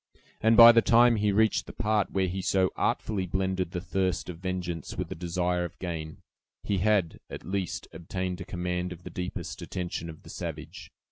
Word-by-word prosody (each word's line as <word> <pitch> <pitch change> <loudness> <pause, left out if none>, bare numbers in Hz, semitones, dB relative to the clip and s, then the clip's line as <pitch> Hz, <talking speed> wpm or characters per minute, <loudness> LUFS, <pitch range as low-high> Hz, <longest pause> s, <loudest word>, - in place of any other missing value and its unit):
And 110 0 +4
by 115 0 +12
the 115 0 +5
time 120 0 +5
he 105 0 +2
reached 110 +1 +2
the - - -8
part 105 -1 +1
where 95 -1 +1
he 95 +2 -3
so 95 0 +2
artfully 95 -4 -1
blended 95 0 -1
the 90 - -4
thirst 95 0 -1
of 85 -2 -7
vengeance 90 -3 -4
with - - -3
the - - -3
desire 90 +1 -1
of 85 0 -7
gain, 80 -3 -6 0.4
he 100 -2 0
had, 100 -4 +1
at - - -8
least, 95 0 -3
obtained 90 +1 -4
a - - -3
command 90 0 -3
of 90 0 -9
the - - -8
deepest 90 0 -5
attention 90 -2 -4
of 80 - -11
the - - -13
savage. - - -7
90 Hz, 195 wpm, -28 LUFS, 90-100 Hz, 0.4 s, by